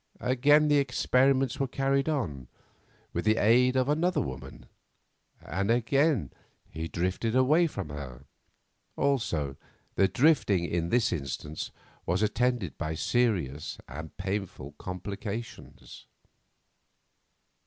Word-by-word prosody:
Again 145 Hz, +4 st, +4 dB
the 145 Hz, -1 st, +4 dB
experiments 135 Hz, -1 st, +2 dB
were 135 Hz, -, +1 dB
carried 135 Hz, +3 st, 0 dB
on, 75 Hz, -, -2 dB, 0.7 s
with -, -, -2 dB
the 110 Hz, +1 st, +3 dB
aid 125 Hz, +4 st, +4 dB
of 130 Hz, 0 st, +2 dB
another 170 Hz, +5 st, +1 dB
woman, 65 Hz, 0 st, -6 dB, 0.7 s
and 100 Hz, +3 st, -3 dB
again 125 Hz, -, +2 dB, 0.3 s
he 80 Hz, +2 st, -5 dB
drifted 95 Hz, +7 st, -1 dB
away 150 Hz, +7 st, +4 dB
from 100 Hz, -, -6 dB
her; 70 Hz, -3 st, -8 dB, 0.7 s
also 100 Hz, -, 0 dB, 0.4 s
the 95 Hz, -, +3 dB
drifting 105 Hz, -, +3 dB
in 85 Hz, 0 st, -1 dB
this 120 Hz, -1 st, +2 dB
instance 75 Hz, 0 st, -4 dB, 0.4 s
was 90 Hz, +5 st, +1 dB
attended 120 Hz, -3 st, 0 dB
by 80 Hz, -1 st, -2 dB
serious 85 Hz, -, 0 dB
and 80 Hz, +1 st, -9 dB
painful 95 Hz, -7 st, -4 dB
complications. 100 Hz, +5 st, -7 dB
105 Hz, 110 wpm, -28 LUFS, 85-130 Hz, 0.7 s, Again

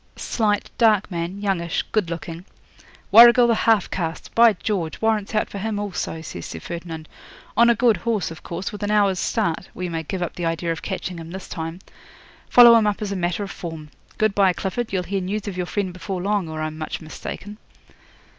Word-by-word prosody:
'"Slight, 210 Hz, -3 st, -1 dB
dark 215 Hz, -4 st, +4 dB
man, 175 Hz, +3 st, -3 dB
youngish, 175 Hz, -5 st, -1 dB
good 210 Hz, -6 st, +1 dB
looking." 170 Hz, 0 st, -6 dB, 0.7 s
'"Warrigal 240 Hz, +2 st, +9 dB
the 235 Hz, -, +4 dB
half 220 Hz, -3 st, +3 dB
caste! 165 Hz, -3 st, -4 dB
By 230 Hz, -1 st, +6 dB
George! 180 Hz, -4 st, -3 dB
warrants 220 Hz, -1 st, 0 dB
out 215 Hz, -, +1 dB
for 200 Hz, -, -7 dB
him 215 Hz, +1 st, -2 dB
also," 200 Hz, -5 st, -4 dB
says 90 Hz, -, -7 dB
Sir 85 Hz, -, -7 dB
Ferdinand. 165 Hz, -, -7 dB, 0.5 s
"On 235 Hz, +2 st, +6 dB
a 235 Hz, -, +5 dB
good 230 Hz, -2 st, +3 dB
horse, 215 Hz, -4 st, -1 dB
of 165 Hz, -, -10 dB
course, 175 Hz, +2 st, -5 dB
with 210 Hz, -, -8 dB
an 205 Hz, -, -1 dB
hour's 200 Hz, -3 st, +3 dB
start. 185 Hz, -7 st, -1 dB
We 180 Hz, -1 st, -4 dB
may 165 Hz, -1 st, -2 dB
give 180 Hz, +3 st, -4 dB
up 175 Hz, -, -4 dB
the 175 Hz, -, -4 dB
idea 165 Hz, +1 st, -1 dB
of 165 Hz, -, -4 dB
catching 185 Hz, -2 st, -4 dB
him 165 Hz, 0 st, -9 dB
this 190 Hz, +2 st, -8 dB
time. 165 Hz, +1 st, -6 dB, 0.7 s
Follow 240 Hz, -1 st, +9 dB
him 225 Hz, -2 st, +5 dB
up 205 Hz, -, 0 dB
as 200 Hz, -, -3 dB
a -, -, -2 dB
matter 180 Hz, +2 st, -1 dB
of 195 Hz, -, -6 dB
form. 160 Hz, -3 st, -7 dB, 0.3 s
Good 215 Hz, -2 st, +2 dB
bye, 195 Hz, -2 st, +4 dB
Clifford. 215 Hz, +6 st, -3 dB
You'll 185 Hz, -2 st, 0 dB
hear 195 Hz, +2 st, -2 dB
news 205 Hz, +3 st, -3 dB
of 200 Hz, -, -4 dB
your 180 Hz, -1 st, -3 dB
friend 190 Hz, -2 st, -2 dB
before 185 Hz, +1 st, -5 dB
long, 195 Hz, -2 st, -1 dB
or 155 Hz, 0 st, -4 dB
I'm 155 Hz, 0 st, -5 dB
much 155 Hz, -, -4 dB
mistaken." 205 Hz, +6 st, -8 dB
190 Hz, 210 wpm, -22 LUFS, 170-210 Hz, 0.7 s, Warrigal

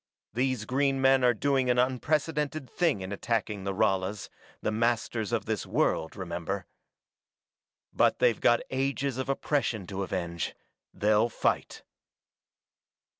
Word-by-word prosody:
These 125 Hz, -2 st, 0 dB
green 135 Hz, +3 st, +1 dB
men 135 Hz, 0 st, +4 dB
are 120 Hz, -1 st, +4 dB
doing 135 Hz, +2 st, +1 dB
an 125 Hz, -, +3 dB
unprecedented 145 Hz, +3 st, 0 dB
thing 160 Hz, -, +1 dB
in 95 Hz, +1 st, -5 dB
attacking 105 Hz, -2 st, -2 dB
the 100 Hz, -, 0 dB
Ralas, 95 Hz, +2 st, 0 dB, 0.3 s
the -, -, -1 dB
masters 115 Hz, -1 st, 0 dB
of -, -, 0 dB
this -, -, -2 dB
world, 80 Hz, -, 0 dB
remember. 90 Hz, 0 st, -4 dB, 1.3 s
But -, -, +3 dB
they've 120 Hz, -3 st, +2 dB
got 120 Hz, -, +4 dB
ages 135 Hz, 0 st, -1 dB
of 130 Hz, -, -3 dB
oppression 135 Hz, -7 st, 0 dB
to 95 Hz, +2 st, -5 dB
avenge; 85 Hz, -3 st, -3 dB, 0.4 s
they'll 105 Hz, +2 st, +2 dB
fight." -, -, -1 dB
120 Hz, 125 wpm, -29 LUFS, 100-135 Hz, 1.3 s, men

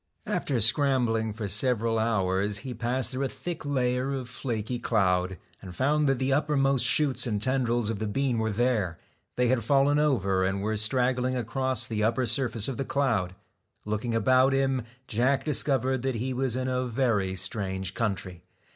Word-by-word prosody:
After 130 Hz, -4 st, -1 dB
scrambling 115 Hz, -2 st, +3 dB
for 105 Hz, 0 st, -5 dB
several 115 Hz, +1 st, +1 dB
hours, 100 Hz, -2 st, 0 dB
he 130 Hz, -, -4 dB
passed 120 Hz, +2 st, -1 dB
through 135 Hz, +1 st, -2 dB
a -, -, -2 dB
thick 175 Hz, -2 st, -6 dB
layer 130 Hz, -1 st, 0 dB
of 130 Hz, -2 st, -5 dB
flaky 120 Hz, -1 st, -4 dB
cloud, 95 Hz, -5 st, +1 dB, 0.2 s
and 90 Hz, -2 st, -10 dB
found 145 Hz, +4 st, +2 dB
that 135 Hz, -, +2 dB
the 130 Hz, +1 st, 0 dB
uppermost 140 Hz, -2 st, +2 dB
shoots 140 Hz, -4 st, +2 dB
and 105 Hz, -3 st, -1 dB
tendrils 120 Hz, -2 st, 0 dB
of 105 Hz, -, -5 dB
the 110 Hz, -, -2 dB
bean 125 Hz, +2 st, 0 dB
were 110 Hz, 0 st, 0 dB
there. 105 Hz, -6 st, 0 dB, 0.4 s
They 125 Hz, -1 st, +1 dB
had 125 Hz, -2 st, +1 dB
fallen 140 Hz, +4 st, +3 dB
over 100 Hz, -11 st, +1 dB
and 95 Hz, +1 st, -1 dB
were 110 Hz, +1 st, -1 dB
strag 125 Hz, +4 st, +2 dB
gling 130 Hz, +1 st, -1 dB
across 125 Hz, 0 st, -1 dB
the 110 Hz, -4 st, -2 dB
upper 115 Hz, +3 st, +1 dB
surface 120 Hz, -4 st, +1 dB
of 135 Hz, -, -4 dB
the 135 Hz, -, -1 dB
cloud. 110 Hz, -11 st, -1 dB, 0.5 s
Looking 110 Hz, +2 st, -2 dB
about 130 Hz, +3 st, +3 dB
him, 135 Hz, -1 st, +1 dB, 0.3 s
Jack 125 Hz, +5 st, +1 dB
discovered 135 Hz, -4 st, +1 dB
that 130 Hz, -1 st, -2 dB
he 130 Hz, +3 st, -2 dB
was 130 Hz, -1 st, -1 dB
in 130 Hz, 0 st, -2 dB
a 130 Hz, 0 st, -1 dB
very 110 Hz, -6 st, 0 dB
strange 95 Hz, -1 st, -3 dB
country. 95 Hz, -5 st, -3 dB
120 Hz, 175 wpm, -27 LUFS, 105-130 Hz, 0.5 s, scrambling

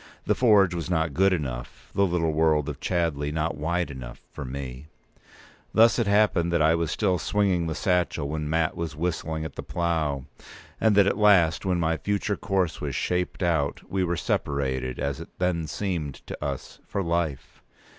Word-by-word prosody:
The -, -, +3 dB
forge 105 Hz, -7 st, +4 dB
was 85 Hz, 0 st, -4 dB
not 80 Hz, -3 st, 0 dB
good 95 Hz, +5 st, +4 dB
enough, 65 Hz, -8 st, -4 dB
the 100 Hz, 0 st, +3 dB
little 85 Hz, -2 st, +1 dB
world 75 Hz, -2 st, +2 dB
of 75 Hz, -2 st, -5 dB
Chadleigh 80 Hz, -5 st, -1 dB
not 80 Hz, +1 st, -1 dB
wide 85 Hz, +2 st, -1 dB
enough, 65 Hz, -3 st, -8 dB
for -, -, -7 dB
me. 65 Hz, +1 st, -6 dB, 0.9 s
Thus 115 Hz, +2 st, +6 dB
it 115 Hz, -, +1 dB
happened 100 Hz, -5 st, +3 dB
that 85 Hz, -, +2 dB
I 80 Hz, +1 st, +4 dB
was 85 Hz, -1 st, 0 dB
still 95 Hz, 0 st, +1 dB
swinging 95 Hz, -3 st, +1 dB
the 80 Hz, -, -2 dB
satchel 90 Hz, -5 st, 0 dB
when 75 Hz, 0 st, -3 dB
Mat 80 Hz, 0 st, +1 dB
was 80 Hz, -2 st, -4 dB
whistling 80 Hz, -1 st, -2 dB
at 80 Hz, -, -6 dB
the -, -, -4 dB
plough, 80 Hz, -6 st, -1 dB, 0.5 s
and 110 Hz, -2 st, +3 dB
that 100 Hz, -1 st, +6 dB
at 100 Hz, -, 0 dB
last, 95 Hz, -4 st, +4 dB
when 90 Hz, -2 st, +1 dB
my 80 Hz, -1 st, +1 dB
future 100 Hz, +2 st, -1 dB
course 95 Hz, -5 st, -1 dB
was -, -, -3 dB
shaped 90 Hz, +1 st, -1 dB
out, 80 Hz, -5 st, 0 dB
we 95 Hz, -1 st, +1 dB
were 85 Hz, -1 st, 0 dB
separated, 65 Hz, -4 st, -1 dB
as 70 Hz, -2 st, -2 dB
it -, -, -9 dB
then 90 Hz, -3 st, 0 dB
seemed 85 Hz, -7 st, -4 dB
to -, -, -7 dB
us, 70 Hz, -2 st, -5 dB
for 100 Hz, -1 st, -2 dB
life. 85 Hz, -5 st, -2 dB
85 Hz, 185 wpm, -26 LUFS, 75-90 Hz, 0.9 s, Thus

